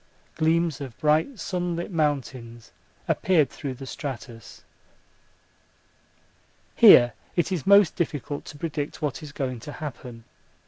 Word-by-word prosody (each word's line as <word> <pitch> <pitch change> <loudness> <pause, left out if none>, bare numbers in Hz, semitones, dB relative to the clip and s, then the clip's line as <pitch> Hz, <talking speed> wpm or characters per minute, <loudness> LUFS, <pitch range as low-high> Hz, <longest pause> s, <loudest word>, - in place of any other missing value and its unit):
Gleams 160 -2 +1
of 130 -5 -8
bright 155 - +1
sunlit 175 -1 -3
mountains 130 - -3 0.4
appeared 160 -7 +2
through 135 -3 -6
the 135 - -9
stratus. 125 -5 -8 2.1
Here 120 0 +8 0.2
it 175 +2 0
is 180 -4 -3
most 200 -2 +6
difficult 145 -3 -3
to 145 - -10
predict 150 -1 -5
what 145 -4 -2
is 150 -2 -9
going 130 -4 -4
to 145 +6 -9
happen. 125 -5 -8
145 Hz, 120 wpm, -25 LUFS, 130-165 Hz, 2.1 s, Here